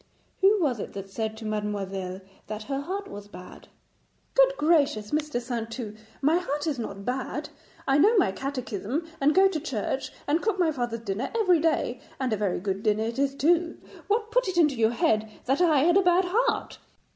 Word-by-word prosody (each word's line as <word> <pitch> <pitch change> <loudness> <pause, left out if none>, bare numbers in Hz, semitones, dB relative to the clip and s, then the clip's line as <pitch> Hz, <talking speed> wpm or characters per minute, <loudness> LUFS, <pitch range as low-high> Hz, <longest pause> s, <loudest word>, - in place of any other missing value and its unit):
'Who 400 +2 +5
was 270 - +1
it - - -6
that 195 -1 -7
said 220 +1 -3
to 220 - -8
mademoiselle 195 -3 -3 0.3
that 215 0 -5
her 275 +3 -3
heart 390 +6 -4
was 205 - -9
bad?' 180 -2 -12 0.7
'Good - - +5
gracious, 285 -10 +2
Mr. 300 -4 0
Saintou, 230 -2 -5 0.3
my 310 +4 +4
heart 295 -4 -3
is 295 -6 -1
not 200 -3 -6
bad. 255 +1 -3 0.4
I 270 +1 +4
know 425 +8 +5
my 365 - +4
catechism 260 - -3 0.2
and 295 +2 +4
go 385 +1 +7
to 365 -5 -2
church, 270 -2 -3
and 315 +4 +1
cook 435 -3 0
my 345 -3 +3
father's 240 -5 -3
dinner 225 +3 -3
every 370 -7 +4
day, 310 -6 0 0.2
and 255 -4 0
a - - +3
very 200 -3 -1
good 195 +1 -2
dinner 215 0 +1
it 230 +3 -3
is 275 0 +1
too. 335 +4 +2 0.3
What 435 +1 0
put - - +2
it 370 -2 -2
into 305 -4 +5
your 225 -3 +3
head 220 -2 +1 0.2
that 270 +6 +1
I 315 -6 +4
had 345 +5 +4
a - - +6
bad 360 0 +4
heart?' 445 +8 0
270 Hz, 195 wpm, -27 LUFS, 215-345 Hz, 0.7 s, go